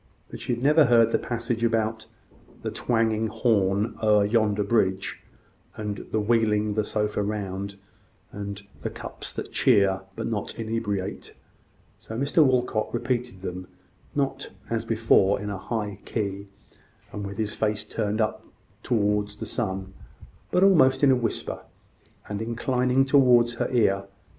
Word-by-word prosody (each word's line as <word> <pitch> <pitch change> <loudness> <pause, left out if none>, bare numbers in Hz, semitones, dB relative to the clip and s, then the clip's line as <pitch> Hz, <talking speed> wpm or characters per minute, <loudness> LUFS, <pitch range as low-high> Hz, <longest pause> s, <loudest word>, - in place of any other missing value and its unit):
But - - -7
she 120 - -1
had 120 - -7
never 150 +2 +6
heard 115 -2 +5
the - - +2
passage 115 -1 -3
about 110 -1 0 0.6
"the - - -2
twanging 115 -2 +1
horn 105 -2 +1
o'er 105 -2 +4
yonder 105 -1 +2
bridge," 95 -3 0 0.6
and 105 -2 -5
"the 110 - 0
wheeling 105 -1 +2
the 110 +1 +1
sofa 105 0 -1
round," 100 -1 -3 0.6
and 100 0 -6 0.2
"the - - -3
cups - - -8
that - - -6
cheer 100 -6 +3
but 115 - -4
not 110 -3 -3
inebriate;" 110 -4 -3 0.6
so 110 - -7
Mr 140 +5 +3
Walcot 125 -5 +1
repeated 120 -4 -2
them, 90 -1 -6 0.5
not, 135 -1 -1 0.2
as 115 0 -1
before, 110 -3 +3
in 105 0 -4
a 100 - -4
high 105 -2 -4
key, 100 -2 -3 0.6
and 105 - -5
with 100 0 -6
his 110 -1 -1
face 105 -1 0
turned 105 -1 -2
up 110 -1 0 0.4
towards 105 -3 0
the 110 - -5
sky, 95 -3 -2 0.7
but 180 - +3
almost 155 -9 +5
in 140 - +7
a - - +5
whisper, 115 -3 -2 0.7
and 105 0 -4
inclining 125 +3 +1
towards 125 -4 +5
her - - -1
ear. 100 -6 +2
110 Hz, 145 wpm, -26 LUFS, 105-120 Hz, 0.7 s, in